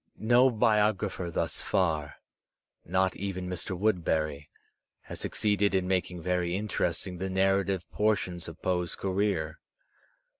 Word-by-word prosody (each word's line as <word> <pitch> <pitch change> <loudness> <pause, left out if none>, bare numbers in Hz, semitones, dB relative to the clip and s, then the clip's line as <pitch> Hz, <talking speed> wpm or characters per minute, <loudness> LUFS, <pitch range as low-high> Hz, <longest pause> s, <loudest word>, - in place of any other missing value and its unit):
No 120 +4 +5
biographer 105 -5 +1
thus 85 - -1
far, 80 -7 0 0.7
not 95 +1 +1
even 95 -2 -4
Mr. 90 0 -3
Woodberry, 80 -7 0 0.5
has - - -8
succeeded 105 -1 +1
in 95 -1 +1
making 90 -2 -1
very 90 -1 0
interesting 95 -3 -2
the 95 +1 -2
narrative 95 -1 +1
por 110 +1 +3
tions 90 -3 -5
of 85 0 -9
Poe*s 90 -2 0
creer. 95 -5 -1
95 Hz, 120 wpm, -29 LUFS, 90-100 Hz, 0.7 s, No